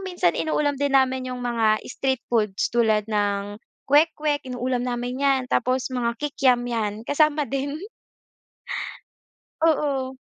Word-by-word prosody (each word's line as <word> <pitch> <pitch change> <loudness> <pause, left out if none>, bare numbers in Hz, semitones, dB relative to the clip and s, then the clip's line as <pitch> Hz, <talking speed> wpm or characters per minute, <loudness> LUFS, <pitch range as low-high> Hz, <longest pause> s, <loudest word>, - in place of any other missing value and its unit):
minsan 180 - +1
inuulam 300 -2 0
din 285 -1 0
namin 260 -1 +1
yung 250 - -6
mga 225 -3 +2
street 265 -2 -1
foods 210 -4 +1
tulad 220 -3 +2
ng 205 -1 -1 0.3
kwek-kwek 300 0 +2
inuulam 250 0 -2
namin 245 0 -3
yan 275 -2 +3
tapos 255 0 +1
mga 240 -2 0
kikiam 270 -4 +2
yan, 215 -3 -2
kasama 300 0 +3
din. 280 +3 -3 1.8
Oo. 280 -5 +1
255 Hz, 120 wpm, -24 LUFS, 230-285 Hz, 1.8 s, yan